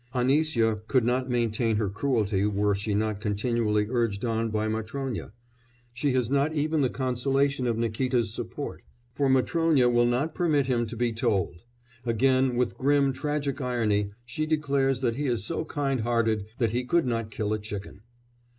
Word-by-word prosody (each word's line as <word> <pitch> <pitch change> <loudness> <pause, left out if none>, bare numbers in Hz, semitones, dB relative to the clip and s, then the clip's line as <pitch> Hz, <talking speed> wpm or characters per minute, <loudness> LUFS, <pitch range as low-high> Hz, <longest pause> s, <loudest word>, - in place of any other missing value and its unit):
Anisya 125 -4 +2
could 130 -2 +3
not 125 +2 0
maintain 115 -2 +1
her 105 -1 0
cruelty 105 -2 0
were 105 0 +1
she 100 +1 -2
not 105 -1 -1
continually 105 0 0
urged 115 -3 -1
on 115 0 0
by 110 0 -1
Matrónya; 110 +2 -4 0.6
she 130 +3 0
has 125 -1 0
not 140 +3 +2
even 155 +1 +1
the 130 - +2
consolation 135 +1 0
of 115 -2 0
Nikíta's 115 0 0
support, - - -5 0.3
for 140 +2 +1
Matrónya 130 -1 +3
will 120 0 +4
not 135 +6 0
permit 155 -6 +2
him 120 -3 0
to 115 - -7
be 120 0 0
told; 110 -7 0 0.5
again 130 +2 +2
with 125 +1 -1
grim 140 0 +3
tragic 145 0 -2
irony 110 -5 0 0.2
she 155 +6 -3
declares 140 -4 +1
that 120 -2 0
he 145 0 -1
is 120 -6 0
so 155 - -2
kind 140 -4 -1
hearted 110 -3 0
that 115 -4 +1
he 120 +2 -1
could 165 +6 +2
not 115 -3 -1
kill 105 0 -2
a 110 - -1
chicken. 105 -1 -7
120 Hz, 170 wpm, -27 LUFS, 110-135 Hz, 0.6 s, will